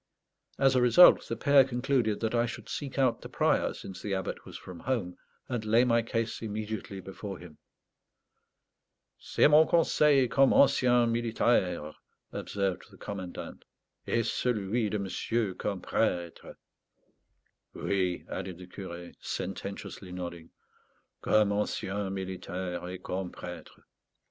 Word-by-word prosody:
As 135 Hz, -1 st, +4 dB
a 125 Hz, -, +4 dB
result 125 Hz, +9 st, +7 dB
the -, -, -2 dB
pair 140 Hz, -2 st, +5 dB
concluded 125 Hz, -4 st, 0 dB
that 110 Hz, 0 st, -1 dB
I 120 Hz, 0 st, +2 dB
should 115 Hz, -, -8 dB
seek 140 Hz, -2 st, -5 dB
out 130 Hz, -4 st, +2 dB
the -, -, -9 dB
Prior, -, -, +2 dB
since 95 Hz, -1 st, -9 dB
the 100 Hz, -2 st, -2 dB
Abbot 95 Hz, -1 st, -4 dB
was -, -, -8 dB
from 90 Hz, -2 st, -10 dB
home, 110 Hz, -6 st, -2 dB, 0.3 s
and 120 Hz, -4 st, -3 dB
lay 110 Hz, +3 st, +4 dB
my 115 Hz, -2 st, +3 dB
case 115 Hz, 0 st, -2 dB
immediately 105 Hz, -2 st, -5 dB
before 95 Hz, +1 st, -7 dB
him. 85 Hz, -4 st, -13 dB, 1.6 s
"C'est -, -, +3 dB
mon 150 Hz, +1 st, +6 dB
conseil 150 Hz, -5 st, +4 dB
comme 135 Hz, +3 st, +4 dB
ancien 125 Hz, -3 st, +4 dB
militaire," 110 Hz, -8 st, +1 dB, 0.4 s
observed 100 Hz, -3 st, -3 dB
the -, -, -17 dB
commandant; 95 Hz, -3 st, -7 dB, 0.4 s
"et 115 Hz, -1 st, +1 dB
celui 110 Hz, -1 st, 0 dB
de 105 Hz, -, -1 dB
monsieur 100 Hz, +1 st, -1 dB
comme 95 Hz, 0 st, -4 dB
prêtre." 85 Hz, -2 st, -2 dB, 1.2 s
"Oui," 95 Hz, -3 st, -1 dB
added 95 Hz, -2 st, -5 dB
the 90 Hz, -, -10 dB
curé, 90 Hz, -1 st, -8 dB
sententiously 95 Hz, 0 st, -5 dB
nodding; 85 Hz, -2 st, -6 dB, 0.7 s
"comme 105 Hz, -1 st, +3 dB
ancien 100 Hz, -1 st, -2 dB
militaire 95 Hz, -2 st, -4 dB
et 90 Hz, 0 st, -8 dB
comme 90 Hz, -1 st, -3 dB
prêtre." 90 Hz, 0 st, -10 dB
105 Hz, 130 wpm, -29 LUFS, 95-120 Hz, 1.6 s, result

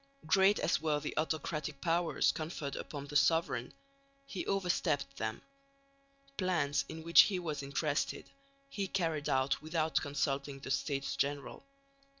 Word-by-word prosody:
Great 195 Hz, +5 st, +5 dB
as -, -, +1 dB
were 155 Hz, -2 st, +1 dB
the 150 Hz, -, -5 dB
autocratic 155 Hz, -2 st, -2 dB
powers 170 Hz, +1 st, +2 dB
conferred 155 Hz, -3 st, -4 dB
upon 145 Hz, -2 st, -6 dB
the 145 Hz, +1 st, -9 dB
sovereign, 160 Hz, +4 st, +2 dB, 0.5 s
he 195 Hz, -9 st, -4 dB
overstepped 170 Hz, -, 0 dB
them. 110 Hz, 0 st, -3 dB, 0.9 s
Plans, 165 Hz, -7 st, +1 dB
in 160 Hz, 0 st, -7 dB
which 170 Hz, +1 st, +8 dB
he 195 Hz, -, -1 dB
was 155 Hz, -5 st, -3 dB
interested, 140 Hz, +2 st, -1 dB, 0.4 s
he 200 Hz, -8 st, -3 dB
carried 165 Hz, -6 st, -1 dB
out 130 Hz, +1 st, +1 dB
without 160 Hz, 0 st, 0 dB
consulting 140 Hz, -1 st, -2 dB
the 135 Hz, 0 st, -6 dB
States 140 Hz, -1 st, -1 dB
General. 140 Hz, -, -2 dB
155 Hz, 135 wpm, -33 LUFS, 140-170 Hz, 0.9 s, which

